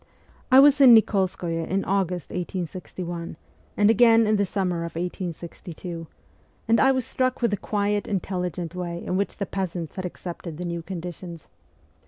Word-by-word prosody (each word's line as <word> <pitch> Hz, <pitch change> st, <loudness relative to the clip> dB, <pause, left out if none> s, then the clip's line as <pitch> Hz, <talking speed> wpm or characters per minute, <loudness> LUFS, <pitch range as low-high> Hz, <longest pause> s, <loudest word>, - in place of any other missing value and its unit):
I 260 Hz, -, +9 dB
was 285 Hz, 0 st, +6 dB
in 250 Hz, -4 st, +10 dB
Nik61skoye 185 Hz, -6 st, +1 dB
in 195 Hz, +1 st, -1 dB
August 185 Hz, -3 st, -1 dB
1861, 175 Hz, -1 st, -5 dB, 0.4 s
and 205 Hz, 0 st, +5 dB
again 230 Hz, -1 st, +6 dB
in 215 Hz, 0 st, +3 dB
the 200 Hz, -1 st, +1 dB
summer 180 Hz, -3 st, -1 dB
of 170 Hz, 0 st, -5 dB
1862, 170 Hz, -1 st, -6 dB, 0.6 s
and 230 Hz, +1 st, +4 dB
I 270 Hz, -, +5 dB
was 260 Hz, -3 st, 0 dB
struck 255 Hz, -1 st, -1 dB
with 235 Hz, -, +3 dB
the 205 Hz, -, 0 dB
quiet 205 Hz, +1 st, -1 dB
intelligent 180 Hz, -3 st, -3 dB
way 175 Hz, -1 st, -5 dB
in 180 Hz, -, -1 dB
which 200 Hz, +1 st, -1 dB
the 200 Hz, -, -2 dB
peasants 180 Hz, -4 st, -4 dB
had 185 Hz, -, -3 dB
accepted 170 Hz, -2 st, -7 dB
the 180 Hz, -, -5 dB
new 170 Hz, -1 st, -3 dB
conditions. 175 Hz, -1 st, -7 dB
185 Hz, 160 wpm, -25 LUFS, 170-205 Hz, 0.6 s, in